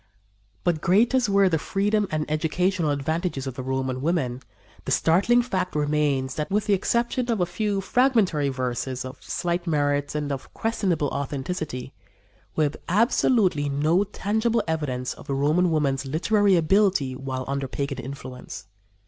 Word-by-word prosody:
But 170 Hz, -3 st, +1 dB
great 215 Hz, +8 st, +3 dB
as 255 Hz, -4 st, +2 dB
were 200 Hz, -1 st, +4 dB
the 165 Hz, -3 st, +1 dB
freedom 205 Hz, +4 st, 0 dB
and 155 Hz, -1 st, -1 dB
educational 165 Hz, +2 st, 0 dB
advantages 145 Hz, +1 st, -1 dB
of 135 Hz, -, -4 dB
the 130 Hz, -, -6 dB
Roman 130 Hz, 0 st, -2 dB
women, 135 Hz, -6 st, -1 dB, 0.4 s
the -, -, -3 dB
startling 200 Hz, +9 st, +3 dB
fact 185 Hz, -8 st, -2 dB
remains 145 Hz, -3 st, +1 dB
that, 150 Hz, +2 st, -3 dB
with 205 Hz, +1 st, 0 dB
the 205 Hz, -, +2 dB
exception 235 Hz, +5 st, 0 dB
of 225 Hz, -3 st, +1 dB
a 180 Hz, -, +3 dB
few 200 Hz, +3 st, -1 dB
fragmentary 195 Hz, -, +2 dB
verses 130 Hz, 0 st, -3 dB
of 130 Hz, +2 st, -9 dB
slight 175 Hz, 0 st, -2 dB
merit 145 Hz, -2 st, 0 dB
and 145 Hz, -1 st, -2 dB
of 135 Hz, -1 st, -5 dB
questionable 195 Hz, -10 st, 0 dB
authenticity, 140 Hz, -1 st, -4 dB, 0.6 s
we 155 Hz, -, +2 dB
have 145 Hz, 0 st, -1 dB
absolutely 200 Hz, -, +3 dB
no 155 Hz, +7 st, +2 dB
tangible 220 Hz, +3 st, 0 dB
evidence 135 Hz, -6 st, -2 dB
of -, -, -14 dB
the 140 Hz, -, -1 dB
Roman 155 Hz, +6 st, +2 dB
woman's 140 Hz, -4 st, +1 dB
literary 200 Hz, +7 st, +3 dB
ability 170 Hz, -5 st, +2 dB
while 130 Hz, -1 st, -4 dB
under 140 Hz, 0 st, -2 dB
pagan 140 Hz, 0 st, -3 dB
influence. 130 Hz, -4 st, -8 dB
155 Hz, 155 wpm, -25 LUFS, 140-195 Hz, 0.6 s, were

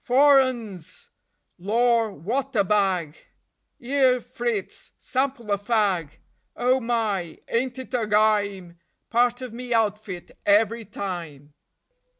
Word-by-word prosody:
Four 275 Hz, +2 st, +6 dB
'Uns; 240 Hz, -, -4 dB, 0.5 s
lor, 230 Hz, +4 st, +2 dB
wot 245 Hz, -, -3 dB
a 205 Hz, -, +4 dB
bag! 190 Hz, -6 st, 0 dB, 0.6 s
'Ere, 260 Hz, 0 st, +2 dB
Fritz, 240 Hz, -4 st, -4 dB
sample 260 Hz, -4 st, -2 dB
a 200 Hz, -, +1 dB
fag! 200 Hz, -8 st, 0 dB, 0.4 s
Oh 255 Hz, +2 st, +2 dB
my, 220 Hz, -8 st, -1 dB
ain't 245 Hz, +2 st, -1 dB
it 260 Hz, 0 st, -9 dB
a 235 Hz, -4 st, 0 dB
gyme! 205 Hz, -5 st, +1 dB, 0.3 s
Part 245 Hz, +1 st, +2 dB
of 250 Hz, -3 st, -7 dB
me 245 Hz, 0 st, -3 dB
outfit 210 Hz, -5 st, -2 dB
every 220 Hz, +2 st, +2 dB
time. 165 Hz, -8 st, -7 dB
225 Hz, 115 wpm, -24 LUFS, 195-245 Hz, 0.6 s, Four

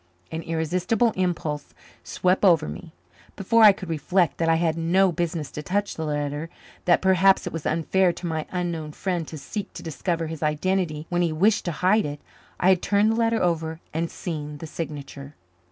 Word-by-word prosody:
An 160 Hz, -, -3 dB
irresistible 180 Hz, +8 st, 0 dB
impulse 165 Hz, -5 st, -2 dB, 0.3 s
swept 185 Hz, +2 st, 0 dB
over 165 Hz, -5 st, +5 dB
me. 180 Hz, -3 st, -8 dB, 0.4 s
Before 230 Hz, +4 st, +2 dB
I 215 Hz, -2 st, +10 dB
could 190 Hz, -1 st, -7 dB
reflect 165 Hz, +2 st, 0 dB
that 165 Hz, -1 st, +2 dB
I 165 Hz, -, +5 dB
had 165 Hz, -1 st, +1 dB
no 180 Hz, +3 st, +3 dB
business 165 Hz, -3 st, -3 dB
to 150 Hz, -, -6 dB
touch 200 Hz, +5 st, -1 dB
the 160 Hz, -, -4 dB
letter, 145 Hz, +1 st, -3 dB, 0.4 s
that 175 Hz, 0 st, +3 dB
perhaps 190 Hz, 0 st, +4 dB
it -, -, -5 dB
was 165 Hz, -2 st, -3 dB
unfair 175 Hz, +3 st, +2 dB
to 180 Hz, -, -8 dB
my 160 Hz, -2 st, -2 dB
unknown 170 Hz, -4 st, -3 dB
friend 175 Hz, -3 st, -2 dB
to 160 Hz, -, -7 dB
seek 195 Hz, +8 st, -6 dB
to -, -, -9 dB
discover 165 Hz, +1 st, -2 dB
his 160 Hz, -1 st, -6 dB
identity 155 Hz, 0 st, 0 dB
when 175 Hz, 0 st, +1 dB
he 170 Hz, -2 st, +1 dB
wished 200 Hz, +7 st, +2 dB
to 175 Hz, -, -1 dB
hide 210 Hz, -1 st, +4 dB
it, 145 Hz, 0 st, -6 dB, 0.4 s
I 180 Hz, -, +4 dB
had 185 Hz, -2 st, +4 dB
turned 210 Hz, +2 st, +3 dB
the -, -, 0 dB
letter 230 Hz, -1 st, +1 dB
over 160 Hz, -2 st, -1 dB
and 165 Hz, +1 st, -1 dB
seen 150 Hz, -4 st, -5 dB
the 160 Hz, -, -8 dB
signature. 145 Hz, -2 st, -7 dB
170 Hz, 190 wpm, -24 LUFS, 155-185 Hz, 0.4 s, I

